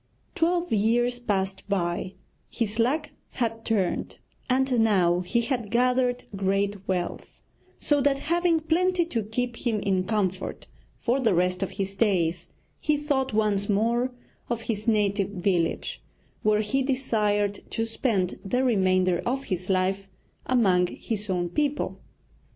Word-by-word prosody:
Twelve 345 Hz, -2 st, +1 dB
years 240 Hz, +3 st, +2 dB
passed 195 Hz, -4 st, -1 dB
by; 185 Hz, 0 st, -1 dB, 0.3 s
his 225 Hz, -1 st, -2 dB
luck 295 Hz, +6 st, +1 dB, 0.2 s
had 225 Hz, -2 st, -2 dB
turned, 200 Hz, -5 st, -1 dB, 0.3 s
and 260 Hz, -1 st, +2 dB
now 185 Hz, -6 st, +3 dB
he 210 Hz, +7 st, 0 dB
had 240 Hz, -3 st, -2 dB
gathered 250 Hz, +1 st, +2 dB
great 195 Hz, +1 st, 0 dB
wealth, 180 Hz, -2 st, -3 dB, 0.4 s
so 290 Hz, -1 st, +2 dB
that 275 Hz, 0 st, +3 dB
having 335 Hz, +2 st, +1 dB
plenty 350 Hz, +2 st, +2 dB
to 235 Hz, -9 st, -2 dB
keep 230 Hz, +3 st, -3 dB
him 225 Hz, -4 st, 0 dB
in 190 Hz, -2 st, 0 dB
comfort 190 Hz, -3 st, -2 dB, 0.3 s
for 255 Hz, +2 st, 0 dB
the 225 Hz, -8 st, +2 dB
rest 180 Hz, +1 st, +1 dB
of 195 Hz, -, -1 dB
his 195 Hz, 0 st, -4 dB
days, 180 Hz, -5 st, +1 dB, 0.3 s
he 300 Hz, 0 st, +1 dB
thought 285 Hz, -3 st, 0 dB
once 210 Hz, -2 st, +1 dB
more 235 Hz, +5 st, +2 dB, 0.4 s
of 235 Hz, -1 st, -1 dB
his 220 Hz, -1 st, -4 dB
native 205 Hz, -3 st, +2 dB
village, 180 Hz, -3 st, -1 dB, 0.4 s
where 215 Hz, 0 st, +3 dB
he 265 Hz, +6 st, 0 dB
desired 210 Hz, -6 st, 0 dB
to 225 Hz, -, -1 dB
spend 220 Hz, -5 st, -1 dB
the 250 Hz, +6 st, 0 dB
remainder 185 Hz, -6 st, +2 dB
of 265 Hz, +3 st, -1 dB
his 185 Hz, -3 st, -4 dB
life 195 Hz, +1 st, 0 dB, 0.4 s
among 190 Hz, -8 st, +3 dB
his 210 Hz, +2 st, -5 dB
own 180 Hz, -2 st, 0 dB
people. 290 Hz, -, -1 dB
215 Hz, 140 wpm, -26 LUFS, 195-250 Hz, 0.4 s, now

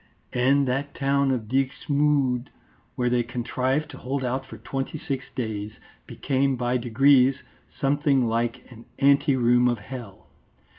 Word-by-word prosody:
'" -, -, -39 dB
And 135 Hz, +2 st, +3 dB
that 135 Hz, +3 st, -2 dB
town 140 Hz, 0 st, +1 dB
of 120 Hz, -5 st, -1 dB
Dixmude, 135 Hz, 0 st, +1 dB, 0.5 s
where 125 Hz, -2 st, 0 dB
they 120 Hz, 0 st, +2 dB
contrived 130 Hz, +4 st, -2 dB
to 135 Hz, -, -11 dB
hold 130 Hz, +1 st, -3 dB
out 130 Hz, +2 st, -2 dB
for -, -, -10 dB
twenty 135 Hz, +3 st, -4 dB
six 135 Hz, -4 st, -4 dB
days, 110 Hz, -3 st, -4 dB, 0.3 s
became 135 Hz, 0 st, 0 dB
by 125 Hz, 0 st, 0 dB
degrees 130 Hz, +2 st, +3 dB, 0.4 s
something 140 Hz, -3 st, +2 dB
like 115 Hz, +1 st, -1 dB
an 115 Hz, -1 st, -13 dB
ante 140 Hz, 0 st, +4 dB
room 125 Hz, 0 st, +3 dB
of 120 Hz, -1 st, +1 dB
hell. 110 Hz, -2 st, -10 dB
130 Hz, 145 wpm, -25 LUFS, 120-140 Hz, 0.5 s, ante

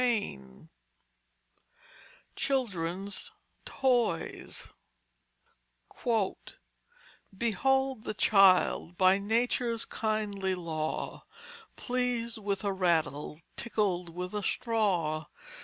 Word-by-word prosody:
CHAPTER 245 Hz, -1 st, +4 dB
XVIII 65 Hz, -, -7 dB, 1.7 s
CHILDREN'S 200 Hz, -7 st, -1 dB, 0.3 s
TOYS 245 Hz, -10 st, 0 dB, 2.7 s
_Behold 265 Hz, +3 st, +1 dB
the -, -, -4 dB
child, 190 Hz, -3 st, +4 dB
by 185 Hz, +1 st, +5 dB
nature's 230 Hz, +2 st, 0 dB
kindly 205 Hz, -3 st, -1 dB
law 160 Hz, -3 st, -3 dB, 0.5 s
Pleased 245 Hz, -2 st, -1 dB
with 200 Hz, -2 st, -2 dB
a 200 Hz, -1 st, 0 dB
rattle, 160 Hz, -5 st, 0 dB, 0.2 s
tickled 195 Hz, -6 st, -1 dB
with 180 Hz, +3 st, -5 dB
a 210 Hz, -, -1 dB
straw. 190 Hz, -10 st, 0 dB
200 Hz, 75 wpm, -30 LUFS, 175-230 Hz, 2.7 s, by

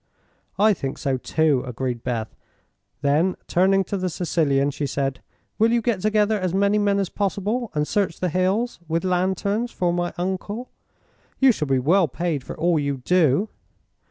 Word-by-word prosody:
"I 215 Hz, +1 st, +5 dB
think 135 Hz, -7 st, -4 dB
so, 135 Hz, -1 st, -1 dB
too," 150 Hz, 0 st, +1 dB
agreed 125 Hz, -1 st, -4 dB
Beth. 115 Hz, -3 st, -3 dB, 0.7 s
Then, 155 Hz, +6 st, +2 dB
turning 195 Hz, +2 st, +3 dB
to 200 Hz, -, -3 dB
the 185 Hz, -1 st, -1 dB
Sicilian, 150 Hz, -5 st, +1 dB
she 145 Hz, 0 st, -3 dB
said: 135 Hz, -1 st, -2 dB, 0.4 s
"Will 225 Hz, +1 st, +4 dB
you 235 Hz, -, +3 dB
get 225 Hz, -4 st, -1 dB
together 215 Hz, 0 st, +2 dB
as 185 Hz, -1 st, -1 dB
many 200 Hz, +2 st, +3 dB
men 200 Hz, -1 st, +2 dB
as 195 Hz, -1 st, 0 dB
possible 205 Hz, +4 st, -2 dB
and 150 Hz, 0 st, 0 dB
search 200 Hz, -5 st, -1 dB
the 180 Hz, -, 0 dB
hills, 190 Hz, +8 st, 0 dB
with 165 Hz, +2 st, -1 dB
lanterns, 190 Hz, +5 st, 0 dB
for 175 Hz, -6 st, -1 dB
my 175 Hz, 0 st, -1 dB
uncle? 190 Hz, +6 st, -4 dB, 0.7 s
You 265 Hz, -1 st, +6 dB
shall 155 Hz, -10 st, -2 dB
be 135 Hz, -1 st, +2 dB
well 165 Hz, +8 st, +3 dB
paid 155 Hz, 0 st, -2 dB
for -, -, -8 dB
all 165 Hz, 0 st, +2 dB
you 140 Hz, -1 st, -1 dB
do." 170 Hz, -, +2 dB
180 Hz, 170 wpm, -23 LUFS, 145-200 Hz, 0.7 s, You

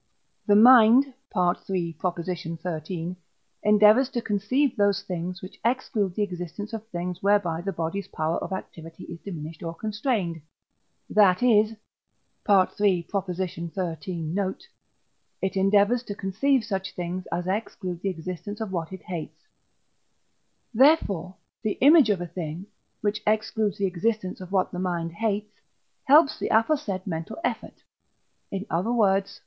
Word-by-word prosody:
The 205 Hz, -, +5 dB
mind 245 Hz, +3 st, +7 dB, 0.2 s
(III. 175 Hz, -1 st, 0 dB, 0.3 s
xiii.) 170 Hz, 0 st, -4 dB, 0.5 s
endeavours 210 Hz, +5 st, +5 dB
to 240 Hz, -3 st, -2 dB
conceive 240 Hz, +7 st, +1 dB
those 200 Hz, -2 st, +2 dB
things, 180 Hz, 0 st, -5 dB
which 185 Hz, -, -10 dB
exclude 225 Hz, -6 st, 0 dB
the 210 Hz, -, +1 dB
existence 185 Hz, +3 st, -6 dB
of 225 Hz, 0 st, -6 dB
things 180 Hz, -2 st, -5 dB
whereby 195 Hz, -5 st, +2 dB
the 195 Hz, +2 st, -3 dB
body's 170 Hz, +3 st, -3 dB
power 160 Hz, +1 st, -2 dB
of -, -, -6 dB
activity 165 Hz, -3 st, -7 dB
is 170 Hz, -, -9 dB
diminished 160 Hz, -4 st, -8 dB
or 165 Hz, -1 st, -5 dB
constrained; 210 Hz, -, -2 dB, 0.7 s
that 205 Hz, 0 st, +4 dB
is 220 Hz, -2 st, +4 dB, 0.7 s
(III. 190 Hz, -2 st, +3 dB, 0.3 s
xiii. 175 Hz, -1 st, -4 dB
note), 185 Hz, +4 st, -3 dB, 0.7 s
it 190 Hz, 0 st, -2 dB
endeavours 200 Hz, +5 st, +3 dB
to 205 Hz, -4 st, -7 dB
conceive 225 Hz, +7 st, +1 dB
such 190 Hz, -3 st, -4 dB
things 180 Hz, +1 st, -4 dB
as 175 Hz, +1 st, -2 dB
exclude 185 Hz, -3 st, -3 dB
the 195 Hz, -, -1 dB
existence 185 Hz, +4 st, -6 dB
of 220 Hz, -3 st, -4 dB
what 170 Hz, -2 st, -3 dB
it 190 Hz, -2 st, -9 dB
hates; 170 Hz, -4 st, -7 dB, 1.3 s
therefore 205 Hz, -, +3 dB, 0.3 s
the 215 Hz, -2 st, 0 dB
image 290 Hz, -2 st, +6 dB
of 200 Hz, -3 st, +2 dB
a -, -, -2 dB
thing, 170 Hz, +1 st, -6 dB, 0.4 s
which 210 Hz, 0 st, -1 dB
excludes 215 Hz, -1 st, 0 dB
the 200 Hz, -, 0 dB
existence 190 Hz, +1 st, -2 dB
of 185 Hz, 0 st, -9 dB
what 190 Hz, -2 st, +1 dB
the 180 Hz, -, -5 dB
mind 175 Hz, -2 st, -2 dB
hates, 210 Hz, +2 st, -2 dB, 0.5 s
helps 295 Hz, +2 st, +5 dB
the -, -, -2 dB
aforesaid 225 Hz, -5 st, +1 dB
mental 165 Hz, +2 st, -5 dB
effort, -, -, -4 dB, 0.7 s
in 195 Hz, +1 st, -4 dB
other 180 Hz, +8 st, 0 dB
words 200 Hz, -4 st, +2 dB
(III. -, -, -16 dB
195 Hz, 140 wpm, -26 LUFS, 175-215 Hz, 1.3 s, mind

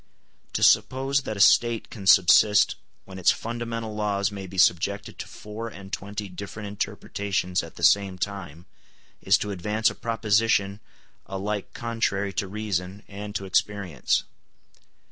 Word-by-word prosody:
To -, -, -1 dB
suppose 135 Hz, +1 st, +3 dB
that 110 Hz, -, -4 dB
a -, -, -6 dB
State 115 Hz, +2 st, +4 dB
can 100 Hz, -4 st, -7 dB
subsist 100 Hz, +3 st, +6 dB, 0.3 s
when 95 Hz, -1 st, -9 dB
its 90 Hz, -, +4 dB
fundamental 115 Hz, -1 st, -4 dB
laws 100 Hz, -1 st, 0 dB
may 100 Hz, -2 st, -7 dB
be 95 Hz, +1 st, -10 dB
subjected 100 Hz, +3 st, +1 dB
to -, -, -6 dB
four 105 Hz, +2 st, -7 dB
and 100 Hz, -3 st, -11 dB
twenty 100 Hz, +1 st, -4 dB
different 100 Hz, +3 st, -8 dB
interpretations 100 Hz, -2 st, -2 dB
at -, -, -11 dB
the -, -, -9 dB
same 100 Hz, -2 st, +4 dB
time 90 Hz, -4 st, -5 dB, 0.6 s
is 95 Hz, +1 st, +4 dB
to 105 Hz, -, -4 dB
advance 105 Hz, +4 st, 0 dB
a -, -, -8 dB
proposition 110 Hz, -3 st, +1 dB, 0.5 s
alike 100 Hz, +1 st, -4 dB
contrary 105 Hz, -4 st, -1 dB
to 100 Hz, -, -2 dB
reason 100 Hz, -1 st, -4 dB
and 105 Hz, +1 st, -8 dB
to 100 Hz, -, -3 dB
experience. 95 Hz, -6 st, 0 dB
100 Hz, 145 wpm, -25 LUFS, 95-110 Hz, 0.6 s, subsist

